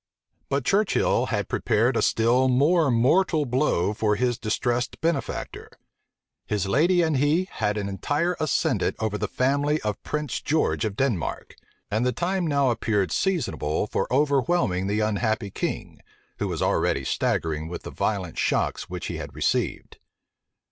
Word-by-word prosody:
But 140 Hz, -2 st, -1 dB
Churchill 205 Hz, +5 st, +2 dB
had -, -, -2 dB
prepared -, -, +1 dB
a -, -, +2 dB
still 120 Hz, +3 st, +3 dB
more 150 Hz, +5 st, +3 dB
mortal 150 Hz, +6 st, +3 dB
blow 120 Hz, -, +1 dB
for 105 Hz, -1 st, +1 dB
his 120 Hz, +2 st, 0 dB
distressed 120 Hz, +2 st, -1 dB
benefactor. 165 Hz, -4 st, -3 dB, 0.8 s
His 105 Hz, -3 st, -1 dB
lady 170 Hz, -, +3 dB
and 160 Hz, -3 st, +1 dB
he 155 Hz, +7 st, +2 dB
had 105 Hz, -1 st, -1 dB
an 100 Hz, -1 st, -2 dB
entire 145 Hz, -, -1 dB
ascendant 155 Hz, -, 0 dB
over 110 Hz, -2 st, -2 dB
the 105 Hz, -, -1 dB
family 140 Hz, +6 st, +1 dB
of 105 Hz, -2 st, -3 dB
Prince 150 Hz, -5 st, -3 dB
George 155 Hz, -5 st, 0 dB
of 105 Hz, -2 st, -3 dB
Denmark; 110 Hz, -, -2 dB, 0.4 s
and 110 Hz, +3 st, +1 dB
the 125 Hz, -, +2 dB
time 175 Hz, +7 st, -1 dB
now 140 Hz, -4 st, +2 dB
appeared 105 Hz, -5 st, 0 dB
seasonable 130 Hz, -, 0 dB
for 100 Hz, -, -2 dB
overwhelming 140 Hz, -, +1 dB
the 105 Hz, +2 st, 0 dB
unhappy 110 Hz, 0 st, -1 dB
king, -, -, -4 dB, 0.4 s
who -, -, -1 dB
was -, -, -2 dB
already 70 Hz, -, +1 dB
staggering 80 Hz, +3 st, -1 dB
with 85 Hz, -, -7 dB
the -, -, -7 dB
violent 95 Hz, -6 st, -2 dB
shocks -, -, 0 dB
which -, -, -5 dB
he -, -, -4 dB
had -, -, -8 dB
received. -, -, -1 dB
125 Hz, 150 wpm, -25 LUFS, 105-150 Hz, 0.8 s, still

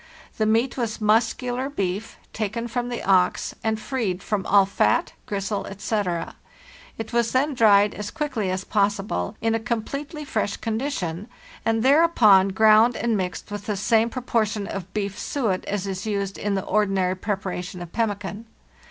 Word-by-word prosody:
The 215 Hz, -, +2 dB
meat 230 Hz, +5 st, +1 dB
was 230 Hz, -3 st, -2 dB
muscular 245 Hz, +4 st, +1 dB
beef, 200 Hz, -4 st, -3 dB, 0.2 s
taken 225 Hz, +2 st, -3 dB
from 245 Hz, +1 st, -2 dB
the 240 Hz, -, -4 dB
ox, 185 Hz, -2 st, +2 dB
and 220 Hz, -1 st, 0 dB
freed 215 Hz, -6 st, -2 dB
from 210 Hz, -3 st, -2 dB
all 200 Hz, -1 st, +6 dB
fat, 195 Hz, -, +1 dB
gristle, 200 Hz, 0 st, -2 dB
etc.; 195 Hz, -3 st, -2 dB, 0.6 s
it 225 Hz, +1 st, -6 dB
was 235 Hz, -1 st, +1 dB
then 280 Hz, +3 st, +2 dB
dried 205 Hz, -4 st, +5 dB
as 205 Hz, 0 st, -5 dB
quickly 275 Hz, -11 st, -2 dB
as 185 Hz, +1 st, -2 dB
possible, 200 Hz, -, 0 dB
in 225 Hz, 0 st, +1 dB
a 225 Hz, -, +1 dB
com 230 Hz, -1 st, -2 dB
pletely 295 Hz, +4 st, -6 dB
fresh 215 Hz, -6 st, -1 dB
condition, 215 Hz, -, -3 dB, 0.4 s
and 225 Hz, 0 st, +1 dB
thereupon 260 Hz, -, +6 dB
ground 220 Hz, +4 st, +5 dB
and 235 Hz, -2 st, 0 dB
mixed 185 Hz, 0 st, -4 dB
with 205 Hz, -1 st, -6 dB
the 210 Hz, -2 st, -1 dB
same 225 Hz, +3 st, +3 dB
proportion 220 Hz, -4 st, -1 dB
of 195 Hz, -2 st, -6 dB
beef 200 Hz, -1 st, -3 dB
suet 220 Hz, -10 st, -1 dB
as 200 Hz, -1 st, -2 dB
is 195 Hz, +1 st, -4 dB
used 200 Hz, -2 st, -2 dB
in 205 Hz, -1 st, -1 dB
the 190 Hz, -, -2 dB
ordinary 195 Hz, -3 st, +1 dB
preparation 190 Hz, -2 st, -4 dB
of 175 Hz, -1 st, -9 dB
pemmican. 210 Hz, -1 st, -2 dB
215 Hz, 160 wpm, -24 LUFS, 195-230 Hz, 0.6 s, all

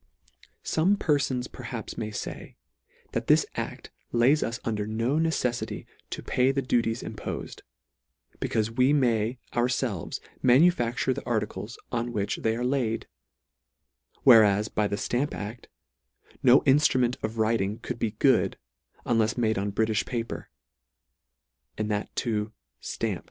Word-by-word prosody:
Some 185 Hz, +6 st, +2 dB
perfons 140 Hz, -7 st, 0 dB
perhaps 120 Hz, -4 st, -7 dB
may 110 Hz, -1 st, -3 dB
fay, 105 Hz, -, -7 dB, 0.5 s
that -, -, -3 dB
this -, -, +5 dB
act -, -, -5 dB, 0.2 s
lays 125 Hz, +6 st, +4 dB
us 115 Hz, 0 st, -2 dB
under 105 Hz, -2 st, -1 dB
no 115 Hz, +6 st, 0 dB
necefftty 160 Hz, -7 st, -1 dB, 0.2 s
to -, -, -5 dB
pay 130 Hz, +1 st, +2 dB
the 135 Hz, 0 st, -1 dB
du 125 Hz, -2 st, +2 dB
ties 115 Hz, 0 st, -3 dB
impofed, -, -, -6 dB, 0.8 s
becaufe 110 Hz, +1 st, -1 dB
we 130 Hz, +3 st, +5 dB
may 120 Hz, -4 st, +2 dB, 0.2 s
ourfelves 120 Hz, -, -1 dB, 0.2 s
ma 125 Hz, -, +5 dB
nufacture 130 Hz, -5 st, +3 dB
the -, -, -6 dB
articles 110 Hz, -1 st, -2 dB
on 120 Hz, 0 st, -2 dB
which 100 Hz, -2 st, -1 dB
they 110 Hz, 0 st, 0 dB
are 120 Hz, +1 st, -2 dB
laid: 125 Hz, -4 st, 0 dB, 1.2 s
whereas 105 Hz, -4 st, +6 dB
by 105 Hz, -1 st, +1 dB
the 100 Hz, -, -2 dB
Stamp 125 Hz, +7 st, -1 dB
act 105 Hz, +4 st, -7 dB, 0.7 s
no 130 Hz, +1 st, +7 dB
inftru 140 Hz, -1 st, +4 dB
ment 125 Hz, 0 st, +1 dB
of 110 Hz, +1 st, -4 dB
writing 110 Hz, -2 st, +1 dB
could 120 Hz, 0 st, -6 dB
be 110 Hz, -2 st, -1 dB
good, 130 Hz, 0 st, +3 dB, 0.5 s
unlefs 115 Hz, -1 st, +1 dB
made 110 Hz, -4 st, +1 dB
on 100 Hz, +1 st, -2 dB
Britifh 110 Hz, +1 st, 0 dB
paper, 115 Hz, -2 st, -4 dB, 1.3 s
and 110 Hz, 0 st, -2 dB
that 105 Hz, 0 st, -1 dB
too 110 Hz, -2 st, -1 dB, 0.3 s
ftampt. -, -, -2 dB
120 Hz, 140 wpm, -27 LUFS, 110-130 Hz, 1.3 s, no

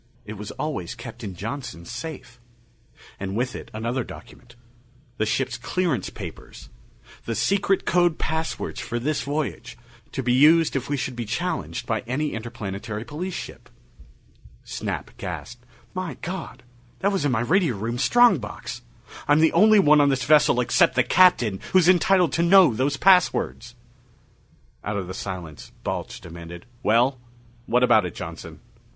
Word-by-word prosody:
It 105 Hz, -, -7 dB
was 105 Hz, 0 st, -8 dB
always 140 Hz, -, -4 dB
kept -, -, -10 dB
in 95 Hz, -3 st, -6 dB
Johnson's 105 Hz, -4 st, -6 dB
safe. 135 Hz, -6 st, -8 dB, 0.8 s
And 95 Hz, 0 st, -4 dB
with 125 Hz, +2 st, -1 dB
it, -, -, -8 dB
another 120 Hz, +4 st, -2 dB
document: 120 Hz, +1 st, -13 dB, 0.6 s
the 110 Hz, -, 0 dB
ship's 125 Hz, +1 st, -1 dB
clearance 130 Hz, -, -1 dB
papers -, -, -10 dB, 0.6 s
the 115 Hz, -, -2 dB
secret 195 Hz, -, +1 dB
code 175 Hz, -2 st, +2 dB
passwords 160 Hz, +2 st, -3 dB
for 120 Hz, -, -4 dB
this 145 Hz, +5 st, -1 dB
voyage, 140 Hz, -4 st, -4 dB, 0.3 s
to 135 Hz, -, -3 dB
be 120 Hz, 0 st, +2 dB
used 155 Hz, +5 st, +5 dB
if 135 Hz, 0 st, -2 dB
we 145 Hz, -, 0 dB
should 130 Hz, -1 st, -3 dB
be 120 Hz, -1 st, -4 dB
challenged 165 Hz, -, -3 dB
by 110 Hz, -2 st, -1 dB
any 145 Hz, +5 st, -1 dB
Interplanetary 110 Hz, -1 st, -5 dB
Police 175 Hz, +6 st, -5 dB
ship. -, -, -8 dB, 0.9 s
Snap -, -, -5 dB
gasped, 120 Hz, 0 st, -7 dB, 0.3 s
"My 185 Hz, -2 st, -4 dB
God, 170 Hz, -8 st, -6 dB, 0.4 s
that 200 Hz, -, +2 dB
was 195 Hz, -6 st, -1 dB
in 145 Hz, -, +1 dB
my 110 Hz, -3 st, +1 dB
radio 160 Hz, -, +2 dB
room 115 Hz, +4 st, -3 dB
strong 240 Hz, -, +5 dB
box! 105 Hz, -, -7 dB, 0.5 s
I'm 145 Hz, -, +5 dB
the 160 Hz, 0 st, +4 dB
only 215 Hz, +1 st, +6 dB
one 150 Hz, -6 st, +6 dB
on 145 Hz, -, +4 dB
this 135 Hz, -1 st, 0 dB
vessel 145 Hz, -3 st, +4 dB
except 125 Hz, +1 st, +3 dB
the 130 Hz, -, +4 dB
Captain 120 Hz, -, +4 dB
who's 185 Hz, -2 st, +5 dB
entitled 185 Hz, -1 st, +4 dB
to 170 Hz, -, +1 dB
know 175 Hz, -4 st, +6 dB
those 135 Hz, +5 st, 0 dB
passwords!" 180 Hz, -10 st, +2 dB, 1.1 s
Out 105 Hz, 0 st, -2 dB
of 95 Hz, -, -3 dB
the 95 Hz, -, -7 dB
silence, 90 Hz, -6 st, -7 dB
Balch -, -, -4 dB
demanded, 85 Hz, +1 st, -10 dB, 0.2 s
"Well, 125 Hz, +4 st, +2 dB, 0.5 s
what 125 Hz, +2 st, +3 dB
about 110 Hz, -6 st, +4 dB
it, 85 Hz, -, -10 dB
Johnson?" -, -, -8 dB
130 Hz, 155 wpm, -24 LUFS, 110-160 Hz, 1.1 s, only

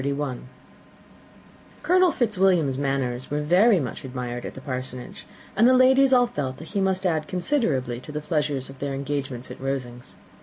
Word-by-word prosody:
Colonel 365 Hz, 0 st, +4 dB
Fitzwilliam's 190 Hz, -, +2 dB
manners 135 Hz, -2 st, -2 dB
were 150 Hz, +1 st, -1 dB
very 185 Hz, +6 st, +5 dB
much 125 Hz, -6 st, -5 dB
admired 125 Hz, -2 st, -5 dB
at -, -, -9 dB
the -, -, -7 dB
Parsonage, 130 Hz, -2 st, -6 dB, 0.3 s
and 225 Hz, +4 st, +5 dB
the 255 Hz, -, +6 dB
ladies 265 Hz, +1 st, +5 dB
all 250 Hz, -1 st, +6 dB
felt 140 Hz, -, -4 dB
that 160 Hz, -, -10 dB
he 200 Hz, -, -1 dB
must 190 Hz, 0 st, 0 dB
add 160 Hz, -4 st, 0 dB
considerably 170 Hz, -, -1 dB
to 140 Hz, -, -10 dB
the 150 Hz, -, -3 dB
pleasure 150 Hz, -2 st, -1 dB
of 135 Hz, +1 st, -8 dB
their 140 Hz, -1 st, -3 dB
engagements 135 Hz, -3 st, -4 dB
at -, -, -10 dB
Rosings. 125 Hz, -3 st, -5 dB
145 Hz, 160 wpm, -24 LUFS, 130-195 Hz, 0.3 s, the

